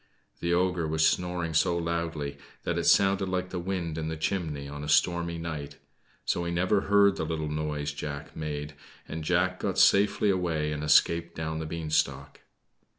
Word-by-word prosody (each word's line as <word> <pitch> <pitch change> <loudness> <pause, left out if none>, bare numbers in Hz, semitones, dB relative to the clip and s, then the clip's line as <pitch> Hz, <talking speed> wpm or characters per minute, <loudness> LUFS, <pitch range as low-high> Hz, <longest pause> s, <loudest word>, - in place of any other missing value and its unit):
The 85 - -1
ogre 90 -1 +1
was 80 0 +3
snoring 90 -2 -1
so 85 +2 +2
loudly 85 -4 -3 0.2
that - - -1
it - - -2
sounded 95 -1 +4
like 90 0 -2
the 90 - -3
wind 85 -3 -3
in 80 - -3
the 80 0 -3
chimney 80 -5 -2
on 75 +1 -7
a 75 - -5
stormy 85 +2 +2
night. 80 -4 -6 0.5
So 85 - 0
he 85 - -2
never 95 +4 +2
heard 100 -1 +4
the - - -2
little 80 -1 -3
noise 75 -1 -2
Jack 70 +1 -6
made, 75 -1 -4 0.3
and 80 0 -5
Jack 90 +2 +1
got 95 -2 -2
safely 100 +1 +4
away 80 -5 -1
and 75 0 -3
escaped 85 +2 +3
down 80 0 -3
the 80 - -4
beanstalk. 75 -4 -1
80 Hz, 175 wpm, -28 LUFS, 75-90 Hz, 0.5 s, sounded